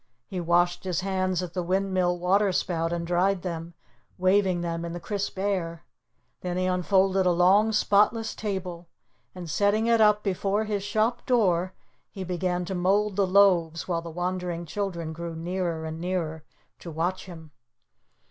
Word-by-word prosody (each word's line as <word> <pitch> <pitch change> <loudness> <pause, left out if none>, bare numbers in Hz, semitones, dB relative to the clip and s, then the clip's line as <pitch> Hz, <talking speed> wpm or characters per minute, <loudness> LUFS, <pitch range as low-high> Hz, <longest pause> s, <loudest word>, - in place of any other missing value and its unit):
He 185 - -5
washed 175 +1 +2
his 185 -1 -1
hands 185 -1 -1
at 175 -1 -7
the 180 - -1
windmill 185 0 0
water 195 +3 +2
spout 165 -2 -1
and 170 -1 -2
dried 180 +2 +1
them, 170 -1 -5 0.4
waving 185 -1 +2
them 170 -1 -3
in 170 0 -5
the 175 - -5
crisp 200 +2 -4
air. 185 -4 -2 0.6
Then 180 -1 -3
he 185 - 0
unfolded 190 +1 +2
a - - +4
long, 190 +5 +4
spotless 210 +2 +2
table, 180 -5 -5 0.5
and 180 -2 -7
setting 205 +7 +1
it 230 -1 +3
up 210 -1 +4
before 200 +2 0
his 210 -2 -2
shop 220 +4 -1
door, 185 -7 +2 0.4
he 190 - -7
began 180 0 -2
to 190 - -4
mold 195 +3 +1
the 195 -1 +2
loaves, 180 -4 +3
while 170 -2 -1
the 170 - -8
wondering 175 0 -3
children 170 -2 -4
grew 170 0 -6
nearer 170 -1 -3
and 160 +1 -6
nearer 165 -3 -3 0.3
to 170 - -9
watch 175 +4 -2
him. 160 -4 -11
180 Hz, 165 wpm, -26 LUFS, 170-195 Hz, 0.6 s, a